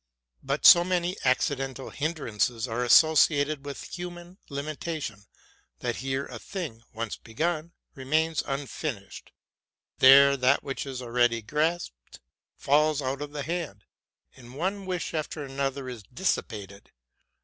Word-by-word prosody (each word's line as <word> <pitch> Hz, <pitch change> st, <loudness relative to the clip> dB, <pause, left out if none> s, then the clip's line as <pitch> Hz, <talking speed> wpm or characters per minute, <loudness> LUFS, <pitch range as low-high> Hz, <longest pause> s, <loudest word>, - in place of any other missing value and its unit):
But 140 Hz, +2 st, -2 dB
so 175 Hz, -, +10 dB
many 180 Hz, 0 st, 0 dB
accidental 135 Hz, 0 st, 0 dB
hinderances 125 Hz, -7 st, -1 dB
are 120 Hz, +1 st, -2 dB
associ 155 Hz, +4 st, +6 dB
ated 145 Hz, 0 st, -1 dB
with 140 Hz, -, -6 dB
human 175 Hz, +1 st, -8 dB
limitation, 140 Hz, -6 st, -5 dB, 0.5 s
that -, -, -3 dB
here 135 Hz, +1 st, -2 dB
a 120 Hz, -3 st, -9 dB
thing, 160 Hz, -, -6 dB
once 115 Hz, -1 st, -4 dB
begun, 160 Hz, +7 st, -3 dB, 0.2 s
remains 155 Hz, +4 st, 0 dB
unfinished: 135 Hz, -5 st, -5 dB, 0.7 s
there 140 Hz, +1 st, +8 dB
that 130 Hz, +2 st, +3 dB
which 135 Hz, 0 st, -4 dB
is 130 Hz, -2 st, -5 dB
already 120 Hz, -1 st, +1 dB
grasped 150 Hz, -, -2 dB, 0.4 s
falls 150 Hz, +1 st, +2 dB
out 135 Hz, +2 st, -2 dB
of 145 Hz, 0 st, -5 dB
the 145 Hz, -1 st, -4 dB
hand, 160 Hz, -, -4 dB, 0.5 s
and 125 Hz, -1 st, -14 dB
one 190 Hz, +5 st, -3 dB
wish 180 Hz, -2 st, -3 dB
after 155 Hz, -1 st, -3 dB
another 135 Hz, -1 st, -3 dB
is 125 Hz, -3 st, -7 dB
dissipated. 100 Hz, -, -4 dB
140 Hz, 125 wpm, -27 LUFS, 125-160 Hz, 0.7 s, so